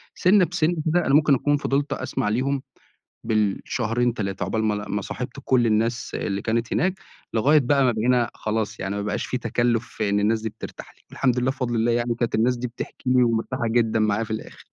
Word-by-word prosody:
سِنّة 185 0 +4
بسِنّة 175 -1 0
كده 175 +2 +2
أنا 135 - +1
مُمكن 150 -1 +5
أكون 145 +3 +1
فضلت 140 0 -1
أسمع 105 - -2
ليهم 130 +4 0 0.6
بالشهرين 115 +2 0
3 100 -3 -3
عُقبال 110 +4 -1
ما 105 -1 +1
ل 105 0 -5
ما 100 0 -1
صاحِبت 125 +1 -6
كل 120 -3 +3
الناس 115 +2 0
اللي 100 -1 -2
كانت 115 +1 -1
هناك 185 +3 +1 0.4
لغاية 145 +7 +5
بقى 135 +1 +2
ما 125 - +3
بقينا 120 +2 +1
خلاص 110 0 -3
يعني 100 +1 -3
ما 100 - -2
بقاش 105 - -2
في 125 - -2
تكلّف 120 0 0
في 105 -2 -3
إن 100 0 +2
الناس 110 +2 +2
دي 110 - -1
بترتاح - - -10
لي. - - -28
الحمد 125 -2 +1
لله 125 +2 +1
بفضل 125 -3 -3
الله 115 +1 +2
يعني 120 0 0
كانت 120 0 -2
الناس 120 +3 +2
دي 125 +1 -3
بتحكي 125 +1 -6
لي 125 -1 +5
ومرتاحة 115 +1 0
جدًا 115 -1 +2
معايا 110 +1 +1
في 110 - -13
الآخر. 110 - -6
120 Hz, 210 wpm, -24 LUFS, 110-130 Hz, 0.6 s, مُمكن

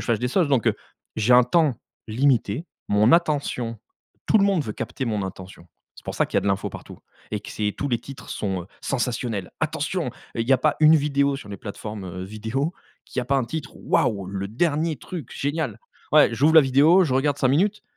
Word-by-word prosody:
fasse 115 -3 0
des 125 - 0
choses, 165 +2 +2
donc 130 -6 +1
heu, - - +1 0.4
j'ai 110 +3 +3
un 125 - +8
temps 160 -3 +2 0.3
limité, 125 +2 +1 0.2
mon 105 +3 +4
attention, 140 -8 +1 0.5
tout 220 - +4
le 200 - +4
monde 195 -6 +2
veut 105 - -4
capter 115 +4 -4
mon 105 -4 -1
intention. 95 -2 -8 0.3
C'est - - -15
pour - - -5
ça - - +1
qu'il - - -4
y - - +6
a - - +1
de - - -3
l'info 95 0 0
partout - - -10 0.3
et - - -1
que - - -10
c'est 105 -1 -2
tous 145 - -2
les 120 -3 +1
titres 135 +3 -11
sont, 95 -4 -3
heu, - - -14
sensationnels. 120 -6 -2
Attention, 160 +2 -1
heu, 125 - -4 0.3
il 115 - -2
y - - +5
a 130 - +5
pas 150 +3 +1
une 155 +1 +7
vidéo 140 -1 +1
sur 120 -7 -11
les 100 - -6
plateformes, 105 0 -7
heu, 90 0 -6
vidéo, 110 - -3 0.3
qu'il - - -8
y - - -3
a - - -6
pas 140 +2 +1
un 130 - +1
titre 150 +4 -6
«waouh 100 -3 0
le 95 0 -4
dernier 155 +5 0
truc 155 -1 -8
génial». 150 +3 -2 0.3
Ouais - - +6
j'ouvre 160 +3 +3
la 160 - +10
vidéo, 150 +7 +5
je 130 - -1
regarde 140 +2 +1
5 130 - +2
minutes. 195 +10 +1
130 Hz, 225 wpm, -24 LUFS, 110-150 Hz, 0.5 s, la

